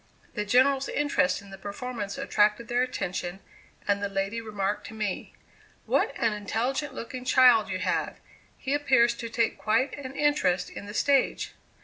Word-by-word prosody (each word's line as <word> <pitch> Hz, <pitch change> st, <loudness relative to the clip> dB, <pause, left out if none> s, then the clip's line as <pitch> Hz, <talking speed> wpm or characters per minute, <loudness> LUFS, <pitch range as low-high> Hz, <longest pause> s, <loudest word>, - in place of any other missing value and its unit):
The 210 Hz, -2 st, -2 dB
General's 265 Hz, +5 st, +3 dB
interest 280 Hz, -11 st, +1 dB
in 200 Hz, -, -14 dB
the 195 Hz, -, -10 dB
performance 205 Hz, +1 st, -5 dB
attracted 230 Hz, -4 st, +2 dB
their 240 Hz, +1 st, +2 dB
attention, 185 Hz, -7 st, -3 dB, 0.5 s
and 200 Hz, 0 st, +2 dB
the 200 Hz, -, -1 dB
lady 195 Hz, +3 st, -2 dB
remarked 205 Hz, -2 st, -3 dB
to 225 Hz, -, -10 dB
me: 210 Hz, -3 st, -4 dB, 0.5 s
"What -, -, +2 dB
an 230 Hz, -2 st, +1 dB
intelligent 255 Hz, +7 st, -2 dB
looking 250 Hz, +1 st, -6 dB
child 250 Hz, -4 st, +5 dB
you 185 Hz, -, -1 dB
have! 185 Hz, 0 st, -1 dB, 0.4 s
He 270 Hz, -, -2 dB
appears 260 Hz, -5 st, +4 dB
to 230 Hz, -, -5 dB
take 230 Hz, 0 st, 0 dB
quite 230 Hz, +6 st, +1 dB
an 270 Hz, -2 st, -8 dB
interest 235 Hz, -13 st, +1 dB
in 200 Hz, -, -8 dB
the 205 Hz, -, -8 dB
stage." 275 Hz, 0 st, +2 dB
230 Hz, 160 wpm, -27 LUFS, 200-260 Hz, 0.5 s, child